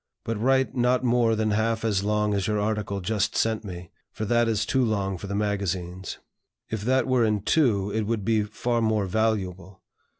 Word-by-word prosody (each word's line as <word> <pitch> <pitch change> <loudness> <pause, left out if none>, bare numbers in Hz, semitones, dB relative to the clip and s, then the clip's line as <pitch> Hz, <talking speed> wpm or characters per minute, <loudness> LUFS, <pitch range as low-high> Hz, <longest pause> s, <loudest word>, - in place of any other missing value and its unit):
But 115 -2 -3
write 130 +2 +2
not 125 +1 +2
more 120 -2 +3
than 110 0 0
half 115 +1 0
as 100 -3 +1
long 105 0 +1
as 100 -2 0
your 105 -1 0
article 105 -2 -2
just 105 +2 -1
sent 110 -1 +1
me, 90 -4 -8 0.2
for 110 - -4
that 120 +1 +2
is 110 -2 0
too 130 - +1
long 100 -4 0
for 95 +3 -7
the 100 - -3
magazines. 95 -3 -2 0.5
If 110 -2 -2
that 130 0 +2
were 130 -2 +2
in 105 -2 +1
two, 105 -9 +2
it 110 0 -1
would 110 -3 -1
be 110 -1 +2
far 115 +3 -1
more 110 -2 +1
valuable. 95 -3 -2
110 Hz, 195 wpm, -25 LUFS, 100-115 Hz, 0.5 s, more